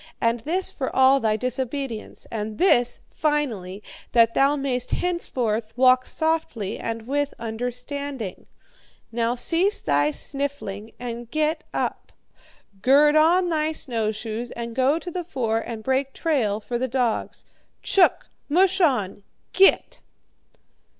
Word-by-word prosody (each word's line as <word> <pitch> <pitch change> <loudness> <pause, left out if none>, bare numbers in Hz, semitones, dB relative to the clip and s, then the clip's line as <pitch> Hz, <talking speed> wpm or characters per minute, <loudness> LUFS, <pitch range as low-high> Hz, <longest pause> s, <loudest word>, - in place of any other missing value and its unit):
And 230 +1 +1
this 340 +10 -2
for 265 - -3
all 265 +1 +6
thy 220 -3 +1
disobedience! 255 0 -4
And 215 -1 -4
this, 245 -9 +3
finally, 225 -11 -2 0.3
that 230 -1 +5
thou 275 +2 +3
mayest 260 -3 -2
henceforth 245 -11 -2
walk 255 0 +5
softly 315 - -1
and 230 -1 -4
with 285 +2 -1
understanding! 245 0 -5 0.6
Now 235 +1 0
cease 340 - +2
thy 145 0 +2
sniffling 225 - -4
and 240 -1 -6
get 310 +2 -1
up! - - -3 0.7
Gird 290 +5 +5
on 345 +4 +4
thy 315 -1 0
snowshoes 225 -3 -2
and 235 -1 -6
go 265 +4 +3
to 350 +1 -6
the 360 +1 -3
fore 235 -9 -1
and 225 -1 -6
break 265 +2 0
trail 245 -11 0
for 240 +3 -4
the 260 - 0
dogs. 245 -2 -2 0.4
CHOOK! 380 -2 +3 0.2
MUSH 375 +4 +3
ON! 225 - +1 0.3
Git!'" 390 0 +4
255 Hz, 125 wpm, -24 LUFS, 225-295 Hz, 0.7 s, all